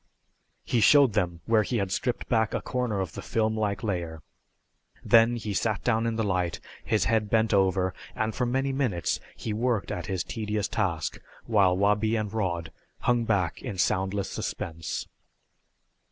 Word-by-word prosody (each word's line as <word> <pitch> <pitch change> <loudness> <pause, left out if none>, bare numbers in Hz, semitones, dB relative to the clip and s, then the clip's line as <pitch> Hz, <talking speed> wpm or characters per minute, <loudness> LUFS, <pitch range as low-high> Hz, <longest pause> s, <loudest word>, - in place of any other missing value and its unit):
He 120 - +1
showed 140 0 +6
them 90 -5 -1
where 115 -1 +4
he 120 +3 -1
had 100 -3 -1
stripped 125 +5 -2
back 110 -3 +1
a - - -1
corner 125 -5 -1
of 95 - -3
the - - -6
film 110 -1 0
like 105 -2 -1
layer. 85 -6 -3 0.8
Then 115 +1 +5
he 110 -3 -4
sat 100 +3 0
down 115 -1 +1
in 115 - -1
the 110 - 0
light, 90 -4 -1 0.2
his - - +1
head 110 +1 +1
bent 110 0 +2
over, 95 -1 +2 0.2
and 110 0 -1
for 125 - -1
many 135 +2 0
minutes 120 -11 0 0.2
he 110 - -4
worked 115 -1 0
at 85 -2 -4
his 95 -3 -1
tedious 105 -2 -2
task 85 -8 -2 0.3
while 95 -5 +3
Wabi 105 +3 +2
and 110 -2 -2
Rod 85 -6 -2 0.3
hung 120 -1 +2
back 95 -7 0
in 115 -7 -5
soundless 95 +2 0
suspense. 80 -2 -4
105 Hz, 170 wpm, -27 LUFS, 95-115 Hz, 0.8 s, showed